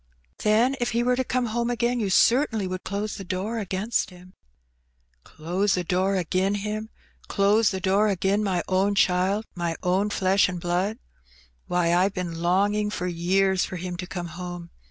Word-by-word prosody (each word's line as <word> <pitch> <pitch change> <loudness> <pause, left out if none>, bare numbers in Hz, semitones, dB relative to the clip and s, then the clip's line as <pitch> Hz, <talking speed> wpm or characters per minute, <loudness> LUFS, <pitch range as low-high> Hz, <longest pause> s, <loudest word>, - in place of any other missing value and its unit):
Then 230 +5 +3
if 240 -2 -1
he 235 +1 +1
were 250 +1 +2
to 260 - 0
come 255 0 -1
home 235 +1 -1
again, 240 +1 0
you 205 -4 -1
certainly 225 0 +3
would 185 0 -4
close 205 +2 -3
the 195 - -6
door 190 +5 -3
against 205 +3 -1
him?" 180 0 -15 0.5
" 60 -1 -43
Close 180 +6 -1
the 180 - -1
door 185 +3 +1
agin 185 +2 0
him! 210 +2 -4 0.4
Close 205 +2 +3
the 190 - -3
door 195 +3 +2
agin 195 +1 +1
my 185 -4 0
own 195 +2 +1
child, 190 +3 +2
my 170 -2 -2
own 190 +3 +1
flesh 190 -1 +2
and 180 -1 -4
blood! 180 +5 -1 0.7
Why, 175 -1 +1
I've 185 +3 +2
been 170 -3 -4
longing 205 +4 +2
for 180 -3 -4
years 185 +2 +1
for - - -5
him 180 0 -5
to 180 0 -6
come 175 -2 -5
home. 175 0 -7
190 Hz, 180 wpm, -25 LUFS, 180-210 Hz, 0.7 s, Then